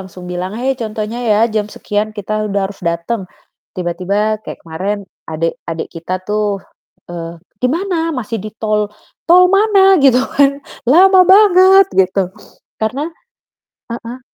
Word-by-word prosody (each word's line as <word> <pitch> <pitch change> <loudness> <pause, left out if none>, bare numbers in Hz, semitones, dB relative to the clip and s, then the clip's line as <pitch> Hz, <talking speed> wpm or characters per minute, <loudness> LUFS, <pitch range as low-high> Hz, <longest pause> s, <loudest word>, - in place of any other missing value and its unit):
langsung 185 -1 -11
bilang, 180 +2 -4
"Hai! 260 +3 0
Contohnya 220 +1 -4
ya 210 -1 +3 0.2
jam 210 -1 0
sekian 210 0 -3
kita 215 +1 -3
udah 200 0 -1
harus 200 - -13
datang." 170 +4 -3 0.5
Tiba-tiba 200 +5 -1
kayak - - -8
kemaren 185 +6 -3 0.3
adek 160 +1 -1 0.2
adek 165 -1 -4
kita 165 +1 -7
tuh, 210 -1 -1 0.5
eee, 170 -1 -6 0.2
"Di 250 - +2
mana?" 330 +1 -1
"Masih 225 -2 -4
di 215 - -6
tol." 210 -2 0 0.4
"Tol 360 +2 +7
mana?" 390 -2 +5
Gitu 265 -3 +5 0.2
kan, 280 -1 +5 0.4
"Lama 375 +6 +6
banget." 385 -1 +6
gitu. 190 -1 +1 0.5
Karena 245 +7 -1 0.9
heeh. 235 +2 -7
215 Hz, 140 wpm, -16 LUFS, 185-275 Hz, 0.9 s, Tol